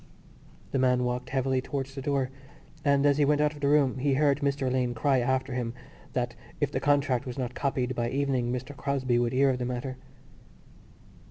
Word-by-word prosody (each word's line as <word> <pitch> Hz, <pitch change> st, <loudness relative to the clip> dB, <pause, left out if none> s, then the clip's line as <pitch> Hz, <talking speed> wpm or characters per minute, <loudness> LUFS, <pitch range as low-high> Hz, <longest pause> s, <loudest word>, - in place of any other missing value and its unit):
The 135 Hz, -, 0 dB
man 125 Hz, -1 st, +3 dB
walked 125 Hz, 0 st, -2 dB
heavily 130 Hz, -1 st, +1 dB
towards 135 Hz, 0 st, -4 dB
the 135 Hz, -, -6 dB
door 135 Hz, -2 st, 0 dB, 0.5 s
and, 140 Hz, -1 st, +3 dB
as 145 Hz, 0 st, +4 dB
he -, -, +5 dB
went 145 Hz, +1 st, +3 dB
out 150 Hz, 0 st, +2 dB
of 150 Hz, -, -11 dB
the 140 Hz, -, 0 dB
room, 140 Hz, -3 st, +3 dB
he 135 Hz, +1 st, +2 dB
heard 145 Hz, 0 st, +3 dB
Mr 140 Hz, -1 st, 0 dB
Alleyne 125 Hz, -1 st, 0 dB
cry 135 Hz, +3 st, +2 dB
after 130 Hz, +1 st, 0 dB
him 120 Hz, -2 st, -3 dB, 0.4 s
that 120 Hz, -1 st, -1 dB, 0.3 s
if 145 Hz, -2 st, 0 dB
the 130 Hz, -, -1 dB
contract 140 Hz, -3 st, +1 dB
was 125 Hz, -, -5 dB
not 125 Hz, -2 st, -3 dB
copied 130 Hz, -2 st, -1 dB
by 120 Hz, -1 st, -1 dB
evening 130 Hz, -3 st, 0 dB
Mr 130 Hz, +3 st, -4 dB
Crosbie 130 Hz, -3 st, 0 dB
would 120 Hz, -1 st, +1 dB
hear 135 Hz, +1 st, +4 dB
of 125 Hz, -, -2 dB
the 125 Hz, -, -1 dB
matter. 125 Hz, +1 st, -4 dB
130 Hz, 200 wpm, -28 LUFS, 125-140 Hz, 0.5 s, he